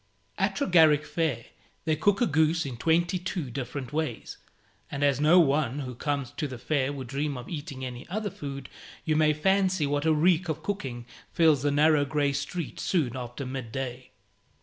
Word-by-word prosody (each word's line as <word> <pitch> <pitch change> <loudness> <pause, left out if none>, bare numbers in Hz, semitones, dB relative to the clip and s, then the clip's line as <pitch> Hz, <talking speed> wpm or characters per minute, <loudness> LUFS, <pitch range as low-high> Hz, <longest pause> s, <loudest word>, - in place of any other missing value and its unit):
At 195 0 +1
Tregarrick 160 -6 +4
Fair 150 -10 -1 0.4
they 160 -1 +2
cook 205 +6 +2
a - - +5
goose 160 -2 +2
in 130 -3 -5
twenty 170 +7 +1
two 175 -7 -4
different 130 +1 -5
ways; 155 -7 -3 0.5
and 140 +1 -3
as 140 -1 +2
no 160 +4 +6
one 145 -3 +2
who 125 -2 -5
comes 140 0 -2
to 150 - -1
the 130 -2 -7
fair 140 +2 0
would 135 -2 -6
dream 140 +2 -2
of 125 - -8
eating 145 -5 -6
any 125 +1 -8
other 205 +2 -2
food, 140 -3 -7 0.4
you 155 - +1
may 155 0 +4
fancy 185 +1 +2
what 145 +2 0
a - - +5
reek 170 +2 +3
of 155 - -3
cooking 135 -13 -4 0.3
fills 160 -5 +4
the 145 - +1
narrow 150 +1 +4
grey 145 0 0
street 155 +3 -4
soon 145 -10 0
after 125 +2 -6
mid 130 -3 -5
day. 130 0 -5
145 Hz, 185 wpm, -27 LUFS, 135-160 Hz, 0.5 s, no